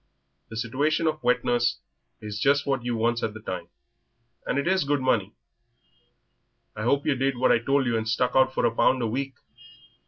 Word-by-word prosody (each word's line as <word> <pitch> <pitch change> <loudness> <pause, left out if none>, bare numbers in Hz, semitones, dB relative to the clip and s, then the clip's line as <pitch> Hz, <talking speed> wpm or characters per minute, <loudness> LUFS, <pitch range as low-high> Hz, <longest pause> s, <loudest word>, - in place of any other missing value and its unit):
The 115 - -7
situation 145 +8 0
of 155 -1 -1
wet 125 0 +2
nurse 120 0 +1 0.4
is 105 -1 -6
just 140 +3 +2
what 135 -3 -1
you 120 -1 -2
wants 115 +1 0
at 110 -1 -3
the - - -7
time, 90 -5 -6 0.8
and - - 0
it 140 - -1
is 190 0 +2
good 145 0 0
money. 115 -7 0 1.4
I 105 - -6
hope 140 +5 +1
yer 150 - +3
did 135 0 -1
what 130 - +3
I - - +4
told 135 +3 +1
you 120 -1 0
and 110 0 -2
stuck 125 +2 0
out 130 0 +4
for - - 0
a 115 - +2
pound 130 +1 +2
a - - +1
week. 135 +3 -3
125 Hz, 205 wpm, -26 LUFS, 115-140 Hz, 1.4 s, I